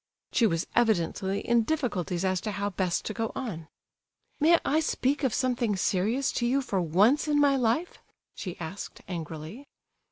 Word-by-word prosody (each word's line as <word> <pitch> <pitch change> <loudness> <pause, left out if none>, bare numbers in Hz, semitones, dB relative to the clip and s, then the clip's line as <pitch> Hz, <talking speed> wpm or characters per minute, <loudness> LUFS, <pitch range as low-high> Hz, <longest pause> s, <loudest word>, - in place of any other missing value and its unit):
She 235 - +4
was 165 -4 -1
evidently 195 -3 +1
in 235 -1 +3
difficulties 205 - -1
as 185 -1 +1
to 215 - -3
how 200 +1 -2
best 185 -2 -1
to 215 - -3
go 225 0 -2
on. 170 -11 -5 0.7
"May 330 +3 +6
I 305 +3 +3
speak 285 -2 0
of 260 - +2
something 245 -3 0
serious 210 +8 +1
to 240 - +2
you, 270 +3 +1
for 195 -7 -1
once 205 - +3
in 295 -1 +2
my 285 -1 +4
life?" 255 +7 0 0.3
she 180 -3 -6
asked, 175 +4 -7
angrily. 165 - -7
220 Hz, 165 wpm, -28 LUFS, 185-265 Hz, 0.7 s, May